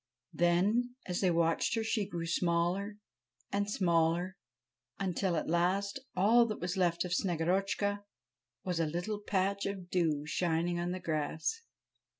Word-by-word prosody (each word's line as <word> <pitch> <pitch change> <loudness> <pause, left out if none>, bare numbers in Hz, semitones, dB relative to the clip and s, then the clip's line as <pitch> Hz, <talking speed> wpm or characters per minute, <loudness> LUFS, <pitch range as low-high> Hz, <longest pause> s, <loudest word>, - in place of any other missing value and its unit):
Then, 205 +9 +2
as 180 -1 -2
they 185 - +3
watched 165 +3 +2
her, 225 - 0
she 215 -3 -1
grew 170 -3 -3
smaller 175 +4 0 0.5
and 200 0 0
smaller, 170 -1 +1 0.6
until, 190 -1 0
at 155 - -1
last, 185 +6 +1 0.2
all 225 +6 +5
that 215 - -4
was 180 +2 -2
left 175 -2 +1
of 180 - -2
Snegorotchka 195 +4 0 0.6
was 180 -2 -1
a 165 - +2
little 175 +7 -3
patch 200 -1 0
of 190 -3 -6
dew 155 -5 +1
shining 170 +2 0
on 175 0 -1
the 185 +1 -3
grass. 160 - -2
180 Hz, 145 wpm, -32 LUFS, 170-200 Hz, 0.6 s, all